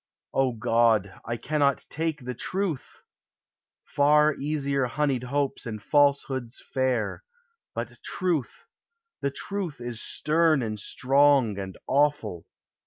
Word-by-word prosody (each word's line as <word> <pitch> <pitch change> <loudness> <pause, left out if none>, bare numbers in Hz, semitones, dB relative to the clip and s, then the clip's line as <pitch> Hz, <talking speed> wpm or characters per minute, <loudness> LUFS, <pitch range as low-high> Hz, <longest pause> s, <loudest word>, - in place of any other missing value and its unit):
O 135 -2 +2
God, 115 -3 +2
I 115 0 -2
cannot 145 0 +1
take 160 -4 -3
the 125 - -3
Truth! 180 - -3 0.8
Far 150 +1 +4
easier 140 -2 -1
honeyed 135 -1 0
hopes 140 -1 -1
and 110 -2 -4
falsehoods 135 -1 +1
fair, 130 - 0 0.5
But - - -5
Truth, 170 - -2 0.6
the 140 - +1
Truth 175 +1 -4
is 120 -2 -5
stern 155 -3 +2
and 110 -2 -3
strong 135 -3 +3
and 95 -1 -6
awful. 145 - +1
140 Hz, 110 wpm, -26 LUFS, 120-150 Hz, 0.8 s, Far